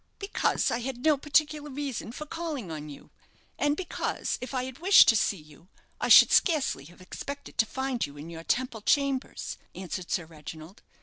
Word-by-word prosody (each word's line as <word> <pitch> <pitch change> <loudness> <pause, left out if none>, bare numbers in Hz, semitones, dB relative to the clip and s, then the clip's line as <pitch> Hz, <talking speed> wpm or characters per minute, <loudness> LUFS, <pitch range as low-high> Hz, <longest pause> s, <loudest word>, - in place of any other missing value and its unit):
"Because 395 0 0
I 235 - 0
had 245 +1 -5
no 310 -1 +6
particular 295 +1 0
reason 270 -5 -4
for 305 +5 -7
calling 300 - -5
on 150 -1 -6
you; 145 - -12 0.5
and 290 +1 +1
because, 365 - -3
if 250 - -6
I 255 -2 -1
had 260 +1 -9
wished 380 +4 +7
to 230 - +5
see 205 -2 +1
you, 155 +2 -17 0.3
I - - -1
should - - +9
scarcely 295 - +2
have 175 +4 -16
expected 280 +9 -8
to 225 - +4
find 265 -1 -2
you 145 0 -5
in 155 +4 -9
your 165 0 -8
Temple 240 +1 -1
chambers," 275 +2 0 0.2
answered 185 -1 -6
Sir 175 - -1
Reginald. 155 +3 -11
250 Hz, 185 wpm, -28 LUFS, -, 0.5 s, should